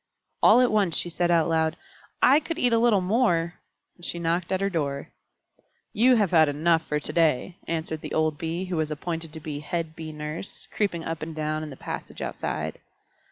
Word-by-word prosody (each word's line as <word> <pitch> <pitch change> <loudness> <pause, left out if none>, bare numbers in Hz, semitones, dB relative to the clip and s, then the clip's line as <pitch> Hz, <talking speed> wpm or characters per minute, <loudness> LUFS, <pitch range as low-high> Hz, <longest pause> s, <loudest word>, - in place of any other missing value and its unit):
All 235 +4 +7
at 250 - +3
once 200 -6 +2
she 175 - -1
said 175 +1 0
out 170 -2 +4
loud, 160 0 +1 0.5
"I 275 +3 +7
could 330 +1 -5
eat 245 -7 +2
a 230 - +4
little 225 -4 +4
more," 180 -4 +1 0.4
and 175 - -19
she 170 - -3
knocked 170 +2 -1
at 190 - +1
her 195 - +1
door. 140 -5 -2 0.8
"You 250 +3 +5
have 205 -6 +2
had 160 -3 +6
enough 160 +3 +2
for 150 - 0
to - - -5
day," 165 +1 +2
answered 160 -1 -2
the - - -5
old 155 -2 +1
Bee 170 +3 -2
who 180 -2 -3
was 155 -1 0
appointed 165 +1 -4
to 160 - -6
be 150 -2 -5
head 160 +1 -3
Bee 160 -1 -7
Nurse, 150 +4 -7
creeping 185 -6 -1
up 165 -1 -4
and 160 +1 -5
down 155 0 -2
in 155 - -5
the 135 - -10
passage - - -7
outside. - - -3
165 Hz, 205 wpm, -26 LUFS, 155-185 Hz, 0.8 s, All